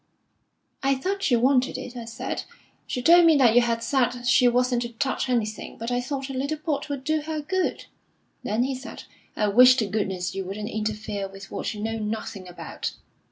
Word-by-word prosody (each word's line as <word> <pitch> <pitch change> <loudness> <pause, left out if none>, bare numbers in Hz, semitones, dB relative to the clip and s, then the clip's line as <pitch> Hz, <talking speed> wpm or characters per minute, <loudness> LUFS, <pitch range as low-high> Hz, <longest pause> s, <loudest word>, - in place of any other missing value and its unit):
'I 275 0 +2
thought 385 +9 -2
she 255 - +3
wanted 255 +2 +2
it,' 250 - -8
I 235 -2 -6
said. 230 0 -4 0.5
'She 250 - -3
told 345 +3 +7
me 330 -2 +6
that 245 -5 +5
you 245 - +6
had 230 -1 0
said 245 -1 0
she 245 0 +5
wasn't 245 0 +2
to 235 -1 -5
touch 265 +2 -1
anything, 220 -4 -2
but 230 +2 -4
I 245 0 +1
thought 270 +1 -4
a 270 - -6
little 280 +4 -2
port 300 -2 -3
would 280 -2 -4
do 310 +2 0
her 310 +1 -4
good.' 370 +5 -1 0.6
Then 220 +4 0
he 270 +1 -1
said, 260 +2 -8 0.3
'I 210 -1 +1
wish 250 +5 +8
to 235 -4 +1
goodness 190 -3 -2
you 195 - -3
wouldn't 205 +3 -5
interfere 210 -2 -3
with 195 0 -12
what - - -3
you 210 - -6
know 225 +1 -2
nothing 210 -3 -4
about.' 180 - -6
245 Hz, 205 wpm, -25 LUFS, 215-270 Hz, 0.6 s, wish